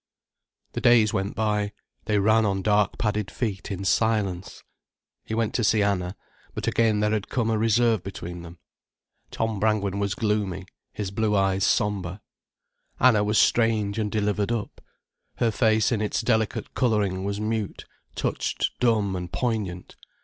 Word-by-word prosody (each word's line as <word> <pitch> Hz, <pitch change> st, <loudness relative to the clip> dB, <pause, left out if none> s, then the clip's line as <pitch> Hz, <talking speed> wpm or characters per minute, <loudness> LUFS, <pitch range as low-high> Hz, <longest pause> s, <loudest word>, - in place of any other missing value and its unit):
The -, -, -4 dB
days 115 Hz, -3 st, +5 dB
went 95 Hz, +1 st, -2 dB
by, 105 Hz, -1 st, 0 dB, 0.3 s
they 105 Hz, -1 st, +1 dB
ran 110 Hz, +2 st, +4 dB
on 95 Hz, -2 st, 0 dB
dark 105 Hz, -1 st, +2 dB
padded 105 Hz, -2 st, -1 dB
feet 105 Hz, -6 st, -4 dB
in 95 Hz, 0 st, -4 dB
silence. 100 Hz, -4 st, 0 dB, 0.6 s
He 110 Hz, -, -4 dB
went 115 Hz, -1 st, 0 dB
to 120 Hz, -, 0 dB
see 105 Hz, 0 st, +3 dB
Anna, 95 Hz, -2 st, -1 dB, 0.4 s
but -, -, -3 dB
again 110 Hz, -2 st, +2 dB
there 105 Hz, 0 st, +2 dB
had 110 Hz, -2 st, -2 dB
come 115 Hz, -3 st, 0 dB
a 110 Hz, -, +1 dB
reserve 115 Hz, -1 st, +3 dB
between 90 Hz, -2 st, -7 dB
them. 85 Hz, +1 st, -11 dB, 0.7 s
Tom 110 Hz, -2 st, -2 dB
Brangwen 100 Hz, -2 st, 0 dB
was 100 Hz, 0 st, -1 dB
gloomy, 105 Hz, -5 st, -1 dB, 0.3 s
his 100 Hz, -3 st, -5 dB
blue 105 Hz, +1 st, 0 dB
eyes 95 Hz, -1 st, +2 dB
sombre. 100 Hz, -4 st, 0 dB, 0.8 s
Anna 115 Hz, -5 st, +5 dB
was 105 Hz, +1 st, +1 dB
strange 110 Hz, -3 st, +2 dB
and 105 Hz, -2 st, -1 dB
delivered 105 Hz, 0 st, 0 dB
up. 115 Hz, -3 st, -4 dB, 0.5 s
Her 115 Hz, -, +1 dB
face 110 Hz, 0 st, +2 dB
in 110 Hz, -3 st, 0 dB
its 105 Hz, +2 st, -1 dB
delicate 110 Hz, -2 st, 0 dB
colouring 105 Hz, -6 st, +1 dB
was 100 Hz, +1 st, -2 dB
mute, 110 Hz, -1 st, -3 dB, 0.3 s
touched -, -, -1 dB
dumb 110 Hz, -5 st, +2 dB
and 90 Hz, -1 st, -5 dB
poignant. 100 Hz, -4 st, -3 dB
105 Hz, 155 wpm, -25 LUFS, 100-110 Hz, 0.8 s, days